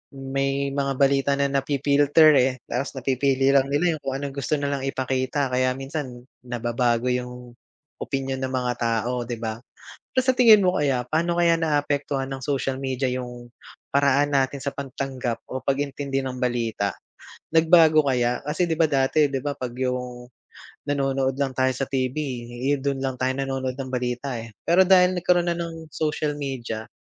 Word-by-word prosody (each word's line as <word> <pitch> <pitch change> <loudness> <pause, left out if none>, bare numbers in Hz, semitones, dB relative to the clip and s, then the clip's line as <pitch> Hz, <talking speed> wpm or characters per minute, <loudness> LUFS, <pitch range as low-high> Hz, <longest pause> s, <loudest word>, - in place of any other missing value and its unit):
may 135 +1 -2
mga 140 -1 -1
balita 140 +1 +2
na 140 0 0
na-fi-filter, 140 +2 +4
eh, 130 +1 +2 0.2
tapos 130 +3 -2
napipili 135 +1 +1
lang 135 -1 +4
nila 160 +4 +1
yung 155 - -11
kung 135 0 -3
anong 140 0 -5
gusto 140 +2 -1
na 140 0 -2
lang 140 -1 -2
ipakita. 130 +1 -1
Kaya 130 0 +1
minsan, 135 -3 -6 0.2
nababago 120 0 0
yung 125 0 -5 0.5
opinyon 135 -1 -3
ng 130 0 -2
mga 125 -1 -1
tao, 120 +1 -1
'di 120 - -3
ba? 110 0 -5 0.5
Pero 260 - +3
sa 260 0 +1
tingin 225 -4 +8
mo 185 -1 +2
kaya, 135 -4 +1
paano 170 +2 +1
kaya 170 -1 +4
naaapektuhan 145 -3 -1
ng 135 -2 -6
social 135 -2 -1
media 130 -1 -2
yung 125 -1 -6 0.4
paraan 140 +1 +3
natin 135 0 +1
sa 140 - -2
pagtanggap 130 -3 -4
o 130 - -3
pag-intindi 140 0 -1
ng 130 -1 -5
balita? 115 -5 -1 0.6
Nagbago 160 -2 +5
kaya? 125 -2 +1
Kasi, 155 +4 0
'di 165 - -1
ba, 160 - +5
dati, 145 +1 +2
'di 135 -1 -3
ba, 145 - -1
'pag 125 -4 -6
yung 125 -1 -3 0.6
nanonood 135 -2 0
lang 140 -1 -1
tayo 130 0 +1
sa 135 - -1
TV, 130 -1 -2 0.6
eh, 145 - 0
don 140 0 -1
lang 135 -1 -2
tayo 130 0 +1
nanonood 135 -1 -3
ng 135 -1 -6
balita, 125 0 -2
eh. 115 - -9 0.2
Pero 180 +2 +4
dahil 185 -1 +6
nagkaroon 175 0 +2
na - - -4
ng 165 -1 -6
social 150 -1 -1
media, 120 -5 -5
135 Hz, 170 wpm, -24 LUFS, 125-145 Hz, 0.6 s, tingin